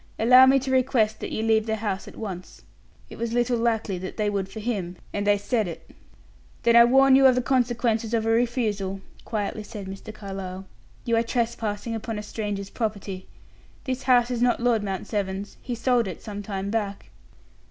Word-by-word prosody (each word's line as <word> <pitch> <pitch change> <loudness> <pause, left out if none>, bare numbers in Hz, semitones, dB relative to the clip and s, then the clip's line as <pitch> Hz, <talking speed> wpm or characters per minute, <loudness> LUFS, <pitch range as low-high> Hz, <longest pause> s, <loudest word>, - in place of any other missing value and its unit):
"Allow 255 +3 +7
me 270 +1 +6
to 265 0 -2
request 250 -4 +2
that - - -5
you 220 - -2
leave 220 0 +2
the 220 - 0
house 205 -3 -3
at - - -11
once." 185 -5 -7 0.5
It - - -10
was 230 0 -2
little 240 0 +1
likely 225 -5 0
that 185 +1 -7
they 210 -1 0
would 195 -1 -2
for 220 - -8
him, 200 -6 -3 0.2
and 205 0 -2
they 205 0 +5
said 215 +1 0
it. 170 - -9 0.7
"Then 235 0 +4
I 235 0 +9
warn 270 +2 +6
you 270 0 +7
of 255 - +5
the 250 - +2
consequences 235 -3 +1
of 225 -1 0
a - - +1
refusal," 220 -5 0 0.2
quietly 215 -1 -3
said 210 -2 -8
Mr. 195 +3 -8
Carlyle; 195 -2 -7 0.4
"you 235 - +2
are - - +4
trespassing 230 -2 -2
upon 225 0 -4
a 210 - -5
stranger's 205 -2 -4
property. 200 -4 -4 0.6
This 260 -1 -3
house 250 -2 +3
is 240 -1 -2
not 245 0 +3
Lord 235 -2 +2
Mount 195 -3 -4
Severn's; 200 -1 -3
he 245 - -4
sold 235 -1 +1
it 185 - -6
some 205 -1 -6
time 200 -1 -4
back." 205 -3 -3
220 Hz, 195 wpm, -25 LUFS, 200-240 Hz, 0.7 s, I